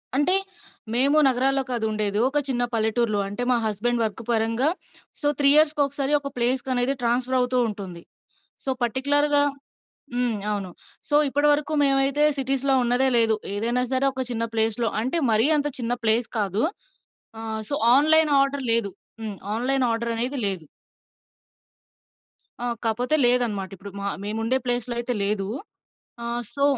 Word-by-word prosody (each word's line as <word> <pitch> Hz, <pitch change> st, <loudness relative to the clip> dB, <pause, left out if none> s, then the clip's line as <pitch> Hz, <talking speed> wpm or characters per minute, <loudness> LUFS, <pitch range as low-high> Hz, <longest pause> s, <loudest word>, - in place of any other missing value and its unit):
అంటే 320 Hz, +7 st, +5 dB, 0.6 s
మేము 275 Hz, +5 st, +3 dB
నగరాల్లో 265 Hz, +1 st, +1 dB
కాదు 235 Hz, -2 st, -1 dB
ఉండేది, 210 Hz, -1 st, -2 dB
ఒక 295 Hz, -, -2 dB
చిన్న 245 Hz, -2 st, 0 dB
పల్లెటూరులో. 220 Hz, -1 st, 0 dB
అంటే 225 Hz, +5 st, -4 dB
మా 245 Hz, -, +3 dB
హస్బాండ్ 230 Hz, +3 st, -1 dB
వర్క్ 220 Hz, +1 st, -4 dB
పరంగా 230 Hz, +5 st, +1 dB, 0.5 s
సో 290 Hz, -, 0 dB
3 280 Hz, -, +6 dB
ఇయర్స్‌ 305 Hz, 0 st, +5 dB
కోకసారి 280 Hz, 0 st, 0 dB
ఒక 280 Hz, -1 st, -6 dB
ప్లేస్‌కనేది 255 Hz, +1 st, +1 dB
ట్రాన్స్ఫర్ 245 Hz, +2 st, 0 dB
అవుతుంటుంది. 220 Hz, -8 st, -2 dB, 0.6 s
సో -, -, -4 dB
పార్టిక్యులర్‌గా 285 Hz, +4 st, +2 dB, 0.7 s
హ్మ్. 245 Hz, -3 st, -1 dB, 0.2 s
అవును. 195 Hz, -3 st, -4 dB, 0.4 s
సో 290 Hz, -, -1 dB
ఇప్పడివరకు 290 Hz, +2 st, +1 dB
మేమైతే 275 Hz, +1 st, +2 dB, 0.2 s
సిటీస్‌లో 270 Hz, 0 st, +1 dB
ఉన్నదే 245 Hz, +2 st, +2 dB
లేదు. 225 Hz, -1 st, +3 dB, 0.2 s
ఏదైనా 235 Hz, +4 st, 0 dB
సరే 260 Hz, +1 st, +2 dB
ఒక 260 Hz, 0 st, -3 dB
చిన్న 230 Hz, -1 st, -2 dB
ప్లేస్‌లో 225 Hz, +1 st, +1 dB
అంటే 260 Hz, +9 st, -1 dB
మరీ 220 Hz, +3 st, +4 dB
అంత 295 Hz, 0 st, 0 dB
చిన్న 235 Hz, 0 st, -2 dB
ప్లేస్ 225 Hz, +1 st, +3 dB
కాదు. 205 Hz, +1 st, -1 dB, 0.8 s
ఆహ్, 220 Hz, -1 st, -4 dB
సో, -, -, -1 dB, 0.2 s
ఆన్‌లైన్ 310 Hz, +2 st, +4 dB
ఆర్డర్ 275 Hz, 0 st, -1 dB
లేదు. 230 Hz, -3 st, +2 dB, 0.3 s
హ్మ్. 215 Hz, -2 st, -5 dB, 0.2 s
ఆన్‌లైన్ 255 Hz, +3 st, 0 dB
ఆర్డరనేది 235 Hz, +3 st, -1 dB
లేదు. 190 Hz, -5 st, -1 dB, 2.0 s
ఆ! -, -, -2 dB, 0.2 s
కాపోతే 245 Hz, +7 st, 0 dB
లేదన్నమాట. 235 Hz, -6 st, +1 dB
ఇప్పుడు 200 Hz, +1 st, -11 dB
మ -, -, -6 dB, 0.2 s
మేముండే 225 Hz, +4 st, -1 dB
ప్లేస్‌లో 245 Hz, 0 st, -1 dB
అయితే 245 Hz, +1 st, -2 dB
లేదు. 200 Hz, -1 st, -1 dB, 0.8 s
ఆహ్, 235 Hz, +1 st, -3 dB
సో 280 Hz, -, -1 dB
245 Hz, 140 wpm, -23 LUFS, 225-270 Hz, 2.0 s, 3